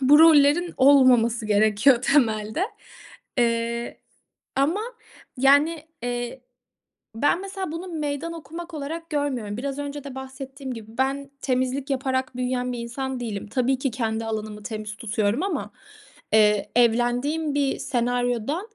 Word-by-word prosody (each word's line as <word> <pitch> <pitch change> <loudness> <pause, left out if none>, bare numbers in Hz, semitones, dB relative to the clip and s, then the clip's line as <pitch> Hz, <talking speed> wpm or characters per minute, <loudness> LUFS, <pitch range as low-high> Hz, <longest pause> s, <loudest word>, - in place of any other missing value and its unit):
bu 280 +3 +6
rollerin 320 +2 +6
olmaması 250 -5 +5
gerekiyor 215 +5 +4
temelde. 225 - +2 0.8
Eee, 235 0 0 0.6
ama, 310 +10 +1 0.6
yani, 290 +4 +3 0.2
eee, 245 +1 -3 0.7
ben, 290 +9 +2
mesela, 385 -4 -5
bunu 340 +3 -5
meydan 310 0 -3
okumak 330 +2 -8
olarak 325 +3 -5
görmüyorum. 260 -9 -2
Biraz 275 +2 -4
önce 285 0 -5
de 275 -2 -8
bahsettiğim 265 0 -7
gibi 225 0 -11
ben 275 +1 -1
temizlik 260 +2 -1
yaparak 260 -1 -1
büyüyen 250 0 -1
bir 240 - -5
insan 260 +2 -4
değilim. 215 -4 -4
Tabii 255 +4 +1
ki 270 -2 -1
kendi 225 -2 -2
alanımı 215 -1 -4
temiz 215 -1 -6
tutuyorum 220 - 0
ama, 395 - -3 0.6
eee, 210 -1 +4
evlendiğim 245 +6 +2
bir 280 -2 +1
senaryoda 245 - -1
260 Hz, 125 wpm, -24 LUFS, 235-285 Hz, 0.8 s, bu